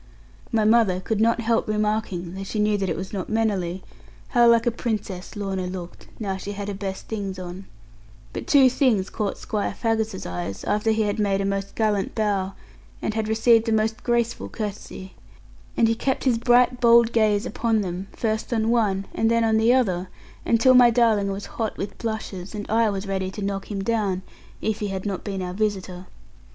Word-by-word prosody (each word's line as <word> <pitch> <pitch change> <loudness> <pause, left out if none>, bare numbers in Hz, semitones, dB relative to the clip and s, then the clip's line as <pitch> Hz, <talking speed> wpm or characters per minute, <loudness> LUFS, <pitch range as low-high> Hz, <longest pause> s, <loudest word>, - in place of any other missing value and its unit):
My 220 -3 +2
mother 215 -5 +4
could 215 +3 -1
not 230 +1 +3
help 230 0 +1
remarking, 210 -5 -1
though 195 +1 -5
she 195 - -5
knew 210 0 +2
that 195 -2 -1
it - - -1
was 190 +3 -6
not 190 -3 -4
mannerly, 195 -5 -1 0.5
how 240 -2 +5
like 230 0 +4
a 240 - +3
princess 215 -6 -4
Lorna 195 -3 -3
looked, 180 -1 -8
now 195 -4 -2
she 200 +1 -6
had 200 0 -5
her - - -3
best 195 -1 -5
things 200 -4 -4
on; 185 +1 -7 0.7
but - - -6
two 275 -3 +6
things 245 -7 +2
caught 210 -2 -2
Squire 210 -2 -3
Faggus's 220 -3 -1
eyes, 90 +2 -5
after 210 +2 0
he 220 0 +2
had 205 +1 -1
made 200 -2 +1
a 195 - 0
most 195 0 -3
gallant 210 -3 0
bow, 200 -3 0 0.5
and 215 - -3
received 225 +1 +4
a - - +1
most 220 0 +1
graceful 235 -1 0
courtesy; 200 -3 -6 0.6
and 230 - +5
he 225 - +3
kept 260 +3 -1
his 245 -4 +2
bright 245 +1 +3
bold 235 -1 +6
gaze 215 -2 +2
upon 225 0 0
them, 185 0 -4
first 220 +1 -2
on 225 -1 +1
one, 200 -5 +1
and 225 - +1
then 230 0 +3
on 220 -1 +3
the 225 +2 +4
other, 190 -8 +1 0.4
until 235 +3 +5
my 250 -1 +8
darling 225 -4 +3
was 195 +1 -5
hot 220 -2 -4
with 200 - -5
blushes, 220 -4 -5
and 205 -1 -5
I 225 0 +3
was 195 0 -3
ready 190 -1 -2
to 200 +2 -6
knock 195 0 -3
him 200 -2 -3
down 200 -4 0 0.4
if 220 -1 -1
he 210 - -2
had 190 0 -4
not 195 -3 -3
been 195 -3 -4
our 180 0 -4
visitor. 190 -3 -3
210 Hz, 195 wpm, -24 LUFS, 195-225 Hz, 0.7 s, my